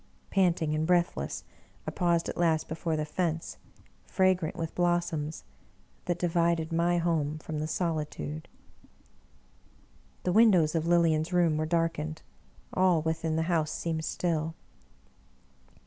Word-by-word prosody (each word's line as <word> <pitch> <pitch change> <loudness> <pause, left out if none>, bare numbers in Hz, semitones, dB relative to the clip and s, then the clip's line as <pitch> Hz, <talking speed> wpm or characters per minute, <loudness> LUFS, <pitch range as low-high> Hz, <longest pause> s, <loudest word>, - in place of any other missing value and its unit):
Panting 175 -5 +2
and 155 +1 0
breathless, 175 -1 0 0.4
I - - -3
paused 170 -2 +1
at - - -4
last 165 -2 +1
before 160 0 -2
the 155 - -1
fence, 165 +1 -2 0.5
fragrant 185 -4 +1
with 165 -1 -4
blossoms, 175 -3 -1 0.6
that 175 -1 0
divided 170 -1 +1
my 170 +1 +2
home 160 -3 0
from 155 0 -5
the 155 - -2
solitude. 155 -2 -3 1.8
The 180 - +1
windows 190 -8 +5
of 165 0 0
Lilian's 165 -1 +3
room 175 -3 +3
were 155 +1 -1
darkened; 165 -2 -1 0.5
all 180 -4 +3
within 160 0 -1
the 160 - +1
house 165 -2 +1
seemed 160 0 -3
still. 160 -1 -1
165 Hz, 125 wpm, -29 LUFS, 155-175 Hz, 1.8 s, windows